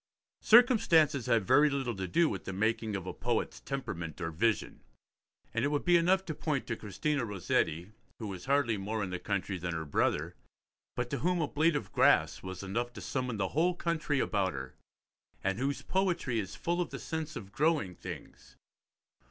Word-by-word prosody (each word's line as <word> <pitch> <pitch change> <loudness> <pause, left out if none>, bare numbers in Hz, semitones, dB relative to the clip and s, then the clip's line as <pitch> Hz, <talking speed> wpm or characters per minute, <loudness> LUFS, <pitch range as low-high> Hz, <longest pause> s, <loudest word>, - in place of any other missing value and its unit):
Circumstances 175 - +5
have 115 -4 +3
very 150 +9 +5
little 135 -5 -2
to 95 -1 -3
do 170 - +3
with - - -4
the 95 - -4
making 110 +1 0
of 95 -2 -4
a 95 - -4
poet's 120 -2 -2
temperament 85 - -5
or 80 - -3
vision, 105 +7 0 0.7
and 115 - 0
it - - +3
would 145 0 -1
be 175 -1 +5
enough 185 +3 +3
to 160 - -3
point 145 -2 -2
to 115 - -2
Christina 125 +8 -2
Rossetti, 90 -3 -1 0.3
who 115 - -6
was 95 -3 -6
hardly 135 -5 +2
more 105 +2 -2
in 95 - -4
the 90 - -3
country 100 -1 -2
than 85 -1 -3
her 80 -1 -3
brother, 70 - 0 0.6
but 120 0 -3
to 140 - -1
whom 180 +4 +1
a 155 - +1
blade 155 +3 +2
of 145 - -3
grass - - +3
was 95 +1 -7
enough 120 +6 -2
to - - -8
summon 125 -4 -2
the 95 -2 0
whole 170 +4 +2
country 160 -5 -1
about 100 -6 0
her, 65 0 -6 0.7
and 95 +2 0
whose 140 +2 -1
poetry 180 -11 0
is 100 -2 -5
full 175 +1 -1
of 175 - -2
the - - -6
sense 160 -1 -4
of 100 -2 -8
growing 150 - +1
things. - - -10
120 Hz, 195 wpm, -31 LUFS, 95-155 Hz, 0.7 s, Circumstances